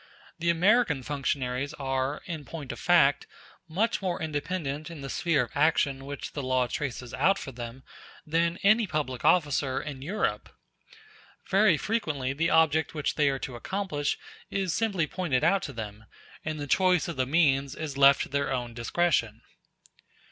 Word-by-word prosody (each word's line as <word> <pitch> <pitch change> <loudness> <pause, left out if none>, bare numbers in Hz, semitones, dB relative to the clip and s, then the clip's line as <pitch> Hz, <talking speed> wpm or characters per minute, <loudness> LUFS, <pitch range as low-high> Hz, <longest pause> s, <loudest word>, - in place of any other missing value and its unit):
The 170 +1 0
American 175 - +3
functionaries 140 0 -2
are, 135 0 -2
in 160 -4 -5
point 145 -4 -7
of - - -8
fact, 165 -6 +4 0.4
much 210 +9 0
more 185 -3 -2
independent 155 -1 -3
in 165 -4 -9
the 135 - -5
sphere 160 -6 +1
of 120 - -9
action 140 -3 +2
which 140 0 -6
the 145 - -3
law 130 -1 +1
traces 125 -1 -4
out 195 +2 +3
for 135 - -7
them 120 +1 -8 0.4
than 170 +2 +1
any 215 +2 +5
public 140 -7 -3
officer 145 -6 +2
in 140 -3 -7
Europe. 140 - -2 1.0
Very 195 -4 +5
frequently 150 - -1
the 165 +4 0
object 160 -1 +3
which 150 -2 -1
they 145 -2 +3
are 135 - -1
to 130 -1 -6
accomplish 150 - -2 0.3
is 190 -4 -1
simply 195 -5 +1
pointed 150 -5 -1
out 195 +2 +3
to 140 - -5
them, 110 -1 -7 0.4
and 155 -1 -4
the 145 - -3
choice 180 +2 +3
of 170 - -4
the 130 -1 0
means 140 -3 +2
is 155 -3 -5
left 140 0 +6
to - - -8
their 140 0 -1
own 120 -2 -2
discretion. 120 -3 0
145 Hz, 165 wpm, -28 LUFS, 135-170 Hz, 1.0 s, left